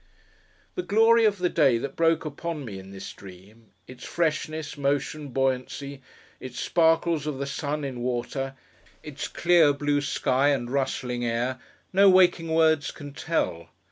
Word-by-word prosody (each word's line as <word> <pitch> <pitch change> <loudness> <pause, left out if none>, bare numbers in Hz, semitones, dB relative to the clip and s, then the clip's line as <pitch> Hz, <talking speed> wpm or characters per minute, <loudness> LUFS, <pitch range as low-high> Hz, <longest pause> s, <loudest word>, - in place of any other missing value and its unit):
The 365 - -2
glory 225 - +4
of 205 -2 +2
the 180 -1 +1
day 140 -8 +3
that 135 +3 -5
broke 165 -1 +2
upon 155 0 -5
me 100 -5 -7
in 95 0 -12
this 95 0 -8
Dream; 100 +4 -15 0.2
its 130 +2 -12
freshness, 155 -2 -2
motion, 145 +1 -1
buoyancy; 135 +1 -2 0.4
its 130 -1 -8
sparkles 165 -2 +2
of 150 -3 -3
the 140 - -3
sun 145 +2 -3
in 130 -3 -5
water; 125 +2 -3 0.5
its 150 -2 -6
clear 170 -4 +4
blue 145 0 0
sky 135 -1 +1
and 130 -4 0
rustling 125 -3 -2
air; 120 +2 -1 0.3
no 195 +1 +6
waking 180 -3 +4
words 160 -2 +3
can 145 -1 -9
tell. 85 - -2
145 Hz, 150 wpm, -26 LUFS, 130-160 Hz, 0.5 s, no